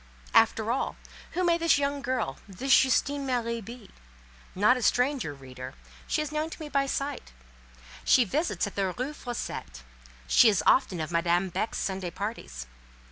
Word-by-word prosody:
After 225 0 +4
all, 260 - -1 0.4
who 365 +2 0
may 340 -1 +3
this 330 -3 +4
young 285 0 -1
girl, 250 - -2
this 255 +8 +3
Justine 280 +2 +2
Marie, 235 -3 -1
be? 230 0 -11 0.6
Not 210 +7 +5
a 250 - -3
stranger, 250 - +1
reader; 130 -1 -9 0.3
she 305 - 0
is 300 - -6
known 305 +1 -1
to - - -9
me 310 -2 -6
by 275 -1 +1
sight; 275 - -3 0.7
she 250 - +5
visits 295 - -1
at 205 - -6
the 195 -2 0
Rue 260 +4 -3
Fossette: 65 - -6 0.4
she 220 - +6
is 200 -4 +1
often 255 -10 +3
of 155 +2 -4
Madame 170 +2 +1
Beck's 215 +5 -2
Sunday 190 -2 -2
parties. 170 - -6
235 Hz, 165 wpm, -28 LUFS, 185-280 Hz, 0.7 s, she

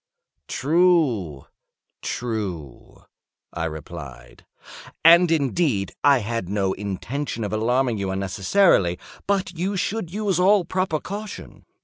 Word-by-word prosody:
"True—true," 115 - -2 0.5
I 85 -1 -2
replied; 75 -3 -9 0.6
"and, 170 +1 +8
indeed, 140 - 0
I 140 -1 +6
had 115 -5 -3
no 100 -2 0
intention 115 +6 -4
of 105 - -3
alarming 120 +1 +1
you 100 -1 -2
unnecessarily—but 100 - +1
you 190 +4 -2
should 185 -1 -2
use 200 -3 -1
all 190 0 +4
proper 185 -4 -1
caution. 205 +4 -8
125 Hz, 95 wpm, -23 LUFS, -, 0.6 s, and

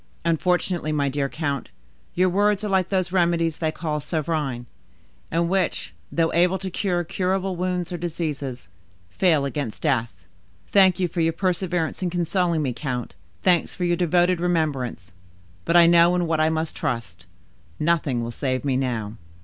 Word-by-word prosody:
Unfortunately, 175 0 +1
my 145 -2 +1
dear 140 0 -1
count, 140 -4 -3 0.5
your 185 +1 +3
words 205 +2 +2
are - - -1
like 190 -2 +1
those 185 -3 0
remedies 170 -3 +1
they 160 -2 0
call 155 -2 -3
'sovereign,' 150 -5 -2 0.6
and 170 +1 +1
which, 190 +1 -1 0.2
though 165 -1 +1
able 180 +3 +3
to 190 0 -5
cure 175 -2 0
curable 185 +2 -1
wounds 180 0 -2
or - - -2
diseases, 150 - -4 0.4
fail 155 - +2
against 140 -5 -4
death. 95 -7 -1 0.5
Thank 190 -3 +5
you 180 - +2
for 170 0 -2
your 165 0 +2
perseverance 180 -1 -1
in 180 - 0
consoling 170 -1 0
me, 130 -3 -1
count, 125 -1 -4 0.3
thanks 180 -3 +2
for 180 - -3
your 175 0 +2
devoted 175 +1 +2
remembrance, 140 - -1 0.5
but 170 - +4
I 170 - +8
know 170 +1 +5
in 175 -1 +1
what 160 -1 0
I 155 0 +3
must 160 0 -2
trust—nothing 95 - -3
will 115 - -4
save 130 +2 -2
me 135 -2 +1
now. 115 -5 -2
165 Hz, 160 wpm, -24 LUFS, 140-180 Hz, 0.6 s, I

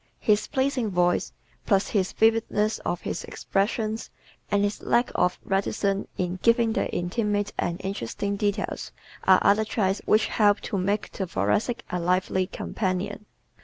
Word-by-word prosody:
His 210 -1 +2
pleasing 260 -4 0
voice 175 -1 +1 0.4
plus 195 -2 +2
the 205 - +3
vividness 220 +1 +1
of 175 - -3
his - - -4
expressions 215 +2 -2 0.4
and 205 0 +2
his 205 +1 -1
lack 240 +1 +2
of 180 0 +1
reticence 195 0 0
in 180 0 -2
giving 230 -1 +3
the - - -1
intimate 205 +3 -1
and 175 +1 -1
interesting 200 - -3
details 205 +1 -2 0.3
are - - +7
other 205 +2 +4
traits 205 -3 0
which 215 - +4
help 205 -1 +3
to 200 - -3
make 200 +3 -1
the 190 - -4
Thoracic 205 - 0
a 180 - -1
lively 185 +1 +1
companion. 200 +2 -3
205 Hz, 145 wpm, -26 LUFS, 185-220 Hz, 0.4 s, are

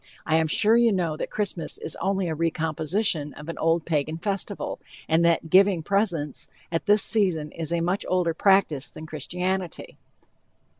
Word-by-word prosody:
I 160 0 +2
am 160 0 +2
sure 215 +8 +3
you 235 -1 +4
know 175 -5 0
that - - -5
Christmas 195 -6 -3
is 160 - -4
only 195 -1 -1
a 160 - -1
recomposition 160 0 -1
of 150 +3 -10
an 165 - -5
old 165 0 +1
Pagan 155 0 -1
festival, 200 +2 -3 0.3
and 160 +1 +3
that 165 -1 +1
"giving 190 -3 +5
presents" 175 -7 -1 0.2
at 165 +5 -2
this 210 0 +5
season 180 -9 +2
is 165 -1 -4
a 170 -1 0
much 180 +4 -1
older 180 -2 +1
practice 185 -6 +2
than 155 - -10
Christianity. 180 +4 -4
170 Hz, 165 wpm, -25 LUFS, 160-195 Hz, 0.3 s, giving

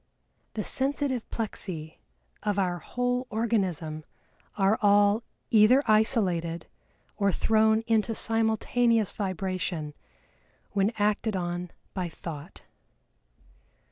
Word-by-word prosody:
"The 215 - -1
sensitive 270 -1 0
plexi 180 -8 -5 0.4
of 205 -1 -1
our 180 -3 0
whole 245 +5 -2
organism 185 -9 -1 0.5
are 200 +2 +3
all 205 +1 +4 0.3
either 230 +5 +6
isolated 190 -7 +1 0.5
or 200 -2 +2
thrown 220 +3 +3
into 225 0 +1
simultaneous 225 0 +1
vibration 185 -5 -3 0.8
when 200 +1 +2
acted 210 0 +1
on 175 -1 -3 0.2
by 180 -3 -2
Thought." 165 +1 -9
205 Hz, 90 wpm, -28 LUFS, 180-225 Hz, 0.8 s, either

